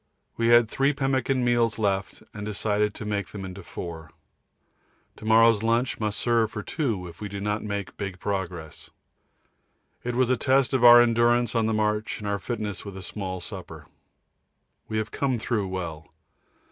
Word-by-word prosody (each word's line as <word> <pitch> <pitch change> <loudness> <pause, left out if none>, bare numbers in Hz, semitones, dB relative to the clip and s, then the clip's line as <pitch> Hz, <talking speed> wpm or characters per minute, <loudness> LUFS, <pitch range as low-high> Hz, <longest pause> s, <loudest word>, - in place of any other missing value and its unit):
We 115 - 0
had 120 -1 +6
three 135 +5 +1
pemmican 135 -2 0
meals 120 -2 +2
left 100 -3 -1
and 105 - -7
decided 105 0 0
to 110 - -6
make 100 -3 -2
them 95 0 -7
into 95 +1 -8
four. 85 -3 -8 1.1
To - - -11
morrow's 115 -1 +5
lunch 115 +3 +1
must 105 -2 -1
serve 115 -2 +2
for 105 -2 -6
two 110 - -2
if 85 +2 -13
we 105 - -4
do 100 0 -5
not 105 +1 -1
make 100 -2 -4
big 100 -3 -5
progress. 90 -6 -5 1.1
It 125 0 -3
was 130 0 +2
a 130 - +2
test 135 +2 +2
of 130 -2 +1
our 120 0 +10
endurance 120 0 +2
on 115 -2 +1
the - - +1
march 105 0 0
and 105 - -6
our 100 0 -1
fitness 105 -5 -4
with 100 -2 -8
small 95 -3 -5
supper. - - -9 1.0
We 110 - -3
have 110 +1 -2
come 135 -3 0
through 110 -3 -1
well. 85 -5 -6
110 Hz, 170 wpm, -26 LUFS, 100-120 Hz, 1.1 s, our